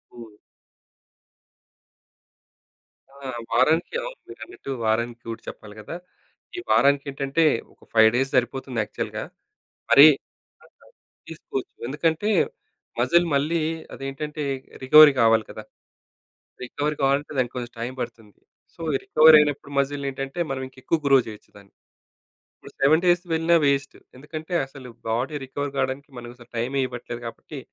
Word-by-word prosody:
హ్మ్. 115 -3 -12 2.7
ఆ! 140 - -20 0.3
వారానికి 155 - +2
అవును. - - -7
మీరన్నట్టు 350 - -9
వారానికి 115 +2 -1
రూట్ 115 0 -6
చెప్పాలి 105 -1 -10
గదా! 105 +9 -8 0.6
ఈ - - -2
వారానికికేంటంటే 140 +2 +2 0.3
ఒక - - -25
5 110 -1 +7
డేస్ 135 +2 0
సరిపోతుంది 125 0 -1
యాక్చువల్‌గా. - - -5 0.7
మరి 140 +2 +10 0.6
ఆ! - - -19 0.6
తీసుకోదు. 155 -5 -6 0.2
ఎందుకంటే 160 - 0 0.7
మజిల్ 170 +1 +3
మళ్ళీ 155 +4 +1 0.3
అదేంటంటే 150 +3 -5 0.4
రికవరీ 150 +2 +8
గావాలి 115 -1 +4
గదా! - - -9 1.0
రికవరీ 145 +4 -3
కావాలంటే 140 +2 +1
దానికి 125 -1 -1
కొంచెం 120 -1 -6
టైం 120 +2 -4
పడుతుంది. 115 -3 -8 0.4
సో - - -13
ఈ - - +3
రికవర్ 155 0 +7
అయినప్పుడు 145 -1 -1
మజిల్ 140 +1 -1
నేంటంటే 135 +3 -5
మనం 135 -1 -3
ఇంకా 130 - -22
ఎక్కువ 165 - +1
గ్రో 135 -1 +6
చేయొచ్చు 105 -1 -11
దాన్ని. 100 -1 -19 0.8
ఇప్పుడు - - -14
7 155 +5 +4
డేస్‌కి 175 0 +2
వెళ్ళిన 165 +1 +2
వేస్ట్. 140 0 0 0.2
ఎందుకంటే 155 +5 -8
అసలు 135 -2 -12 0.2
బాడీ 125 +7 -1
రికవరీ 145 +2 -4
కావడానికి 135 +2 -2
మనం 120 0 -8
అసలు 120 - -17
టైమే 130 +4 -1
ఇవ్వట్లేదు 120 -1 -7
కాబట్టి 135 +5 -9
135 Hz, 130 wpm, -24 LUFS, 120-150 Hz, 2.7 s, మరి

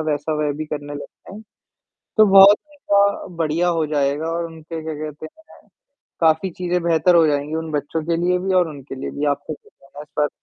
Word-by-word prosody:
वैसा 145 +2 -2
वह 150 -1 -1
भी 155 - -3
करने 145 -1 -6
लग 145 - -6
जाएँ, 210 +3 -14 0.8
तो 215 - +7
बहुत 195 +1 +8 0.2
ऐसा 200 -7 +1
बढ़िया 165 +2 0
हो 155 - +1
जाएगा 145 +1 0
और 170 0 -2
उनके 160 0 -8
क्या 160 0 -4
कहते 150 0 -7
हैं, 320 - -18 0.5
काफ़ी 160 +3 +2
चीज़ें 180 0 -2
बेहतर 170 +1 +3
हो 165 - +5
जाएँगी 145 +1 -1
उन 160 -1 -4
बच्चों 150 +2 -2
के 170 -1 +1
लिए 180 0 +2
भी 190 +1 -1
और 180 -2 +3
उनके 140 -3 -9
लिए 135 - -6
भी। 145 - -4
आपका 145 +2 -8
क्या - - -23
कहना 135 +1 -19
है 150 - -6
इस 150 - -17
पर? 150 0 +3
160 Hz, 215 wpm, -20 LUFS, 150-180 Hz, 0.8 s, बहुत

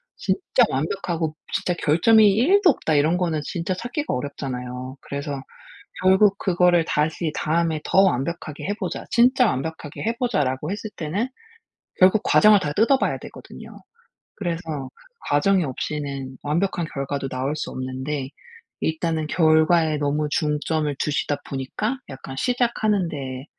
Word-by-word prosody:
진짜 365 -9 +1
완벽하고 160 +2 -2 0.2
진짜 180 - 0
"결점이 210 +9 +5
1 345 - +4
도 365 - +7
없다." 155 - -1
이런 155 +4 +3
거는 165 -4 -1
진짜 170 +4 -3
찾기가 245 - -3
어렵잖아요. 125 -1 -5
그래서 140 -1 -5 0.6
결국 190 +2 +5
그거를 180 -3 +3
다시 155 +1 -1
"다음에 160 0 0
더 190 - +4
완벽하게 155 -2 -1
해 205 - -1
보자. 190 -4 -5
진짜 250 +1 +4
완벽하게 155 -2 -4
해 230 +2 0
보자."라고 150 - -1
했을 210 +1 -5
때는 180 +10 -2 0.7
결국 190 +3 +5
과정을 210 -1 +6
다 150 -5 -2
뜯어 230 - +3
봐야 - - 0
되거든요. - - -11 0.7
그래서 165 -7 -4 0.4
과정이 180 +6 +3
없이는 140 -1 -4
완벽한 170 +3 0
결과도 140 -1 -3
나올 130 +3 -2
수 - - -4
없는데 130 +2 -4 0.5
일단은 160 -1 -1
'결과에 160 0 +3
너무 145 +1 0
중점을 150 0 0
두시다 145 -1 0
보니까 140 - -3
약간 135 0 -8
시작하는 220 - +1
데에 135 -3 -6
160 Hz, 315 characters per minute, -23 LUFS, 145-190 Hz, 0.7 s, 도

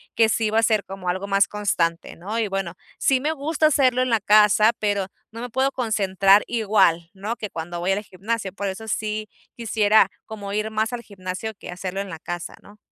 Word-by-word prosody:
que 225 -1 +4
sí 220 -1 +1
va 220 - 0
a 225 - +4
ser 215 -2 +2
como 190 -1 -6
algo 190 +2 -2
más 200 0 +3
constante, 175 -5 -1
¿no? 205 +7 -4
Y 220 - +1
bueno, 195 -3 -3 0.2
sí 265 -1 +2
me 300 +4 -1
gusta 310 +2 +1
hacerlo 255 -4 +3
en 255 - +1
la 225 - +3
casa, 210 +2 +5
pero 205 -2 0 0.3
no 230 - -8
me 245 - -5
puedo 265 +2 +1
concentrar 200 -5 +3
igual, 195 -7 +2
¿no? 205 +4 -4
Que 210 -4 -6
cuando 170 +1 -5
voy 180 +2 0
al 205 +2 0
gimnasio, 200 +1 -4
por 200 +1 -5
eso 220 +4 -6
sí 215 0 -2 0.3
quisiera 220 -2 +3 0.2
como 200 -2 -7
ir 215 +1 -1
más 220 +2 0
al 240 -1 -5
gimnasio 190 +2 -6
que - - -12
hacerlo 185 +2 -4
en 200 - -7
la 165 - -6
casa, 175 +1 -6
¿no? 205 +1 -16
210 Hz, 215 wpm, -23 LUFS, 190-225 Hz, 0.3 s, casa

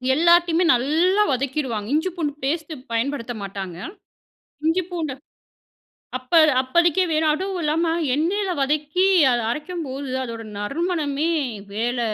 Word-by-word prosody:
எல்லாத்தையுமே 340 +2 +4
நல்லா 320 +11 +2
வதக்கிடுவாங்க. 260 -5 -2
இஞ்சி, 320 +5 +1
பூண்டு 305 -5 -2
பேஸ்ட்டு 315 +3 -2 0.2
பயன்படுத்த 240 +1 -2
மாட்டாங்க. 195 -3 -6 0.9
இஞ்சி, 335 +3 +2
பூண்ட 320 -5 -2 1.1
அப்ப 255 +6 +3 0.2
அப்பதிக்கி 340 +7 +2
வேணா, 315 0 +2
அதுவும் 380 +2 -3
இல்லாம 325 +2 +1 0.2
எண்ணெயில 380 +7 0
வதக்கி 300 +6 +1 0.3
அதை 240 -2 +1
அரைக்கும்போது, 295 -3 -5
அதோட 230 -2 -6
நறுமணமே 300 - -1 0.4
வேல 240 +4 -1
300 Hz, 110 wpm, -22 LUFS, 255-340 Hz, 1.1 s, எல்லாத்தையுமே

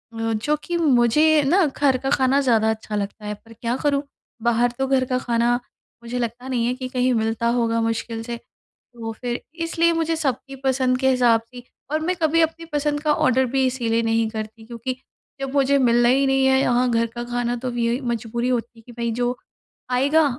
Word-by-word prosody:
जो 225 +5 0
कि 345 - -2
मुझे 300 +1 +4
ना 360 +5 +4
घर 275 -2 +1
का 270 +1 -3
खाना 270 0 +3
ज़्यादा 225 -5 +3
अच्छा 220 -1 -3
लगता 205 +1 -4
है, 210 - -3
पर 225 +2 -15
क्या 235 +1 -2
करूँ, 285 -1 +2 0.4
बाहर 235 +1 +2
तो 270 - +1
घर 265 -1 +2
का 255 0 -1
खाना 235 -1 +1 0.5
मुझे 240 +1 -4
लगता 240 +2 -4
नहीं 245 -3 0
है 245 - +1
कि 255 0 -5
कहीं 255 0 +1
मिलता 225 +1 0
होगा 230 -1 +1
मुश्किल 225 0 -2
से। 235 0 -5 0.4
तो 230 -2 -9
फिर 245 -1 -3 0.2
इसलिए 335 0 +2
मुझे 330 0 0
सबकी 275 -3 -3
पसंद 260 -1 +2
के 265 0 +3
हिसाब 245 -3 +4
सी 245 +2 -13 0.3
और 310 - +1
मैं 355 +4 -1
कभी 325 +1 +3
अपनी 330 +1 -1
पसंद 295 0 0
का 300 0 +2
ऑर्डर 260 -2 +2
भी 265 -1 +3
इसीलिए 235 -3 0
नहीं 225 -1 +1
करती, 220 0 -7
क्योंकि 235 +2 -5 0.5
जब 270 0 -4
मुझे 280 0 +3
मिलना 240 -2 +4
ही 270 +2 +3
नहीं 270 0 +3
है 265 0 +4
यहाँ 245 -1 +2
घर 230 0 +2
का 240 - -4
खाना 240 0 -2
तो 250 +2 -5
अब 245 -1 -4
यही 235 +1 +1
मजबूरी 235 0 -2
होती 240 -2 -1
है - - -15
कि 245 - -12
भई 235 0 0
जो 245 +2 -1 0.6
आएगा 285 +5 +3
245 Hz, 205 wpm, -22 LUFS, 230-270 Hz, 0.6 s, मुझे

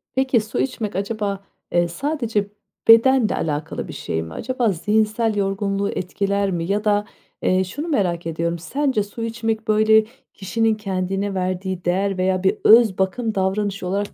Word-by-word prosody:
Peki 260 -2 +3
su 215 +1 -4
içmek 225 -7 -2
acaba, 200 0 -2 0.3
eee, 175 0 +2
sadece 230 - -2 0.4
bedenle 230 +1 +6
alakalı 155 0 -3
bir - - -8
şey 80 - -3
mi? 80 - -9
Acaba 250 -2 -1
zihinsel 215 +4 +1
yorgunluğu 200 0 -1
etkiler 200 +2 -1
mi? 170 -2 -2
Ya 210 +2 0
da, 205 -1 +2 0.4
eee, 185 0 +2
şunu 285 - -5
merak 180 - 0
ediyorum, 170 +1 -2
sence 265 - 0
su 205 +3 -7
içmek 225 -1 -2
böyle 215 0 +4 0.3
kişinin 225 +3 0
kendine 195 -1 -2
verdiği 185 -1 -3
değer 195 +2 0
veya 185 0 0
bir 190 - +2
öz 220 -3 +6
bakım 215 +4 -1
davranışı 195 0 -1
olarak 200 +2 -2
200 Hz, 155 wpm, -21 LUFS, 185-220 Hz, 0.4 s, bedenle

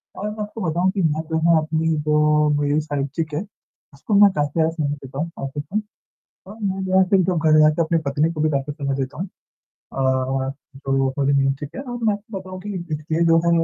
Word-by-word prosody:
और 210 +2 -3
मैं 210 0 -6
आपको 210 +1 -7
बताऊँ 180 +4 +1
कि 195 -1 -2
मैं 155 -1 +1
जो 160 - +1
है 165 - +6
अपनी 160 0 0
जो 150 0 +3
मेरी 145 +1 +2
साइट्री 145 +1 -2
क्या 155 0 -4
है, 205 - -5 0.5
उसको 140 +10 -5
मैं 200 -1 +8
काफी 145 -3 -1
ज़्यादा 160 0 +3
सुना 155 -3 -2
देता 135 +1 -7
हूँ 155 +4 -4 0.8
मैं 190 -1 -1
जो 185 - -3
है - - +7
एसे 195 +2 +3
ही 185 - +3
क्यों 180 -2 +1
खड़े 155 -1 +3
रहेते 155 +2 +5
अपनी 165 +1 +1
पत्नी 150 +4 +1
को 155 - -5
भी 155 - +3
बातें 140 0 -1
सुना 140 -1 -3
देता 135 +2 -4
हूँ 185 +1 -3 0.7
और 130 0 0 0.3
जो 135 0 -4
वो 135 0 +2
बोली 140 0 +2
मीन्स 135 0 +2
ठीक 145 0 -6
है - - -4
और 245 -3 -6
मैं 215 - +4
आपको 205 0 -6
बताऊँ 185 0 -9
कि 210 - -8 0.3
इसके 155 +3 -1
जो 165 0 +5
है - - +4
155 Hz, 230 wpm, -22 LUFS, 145-185 Hz, 0.8 s, मैं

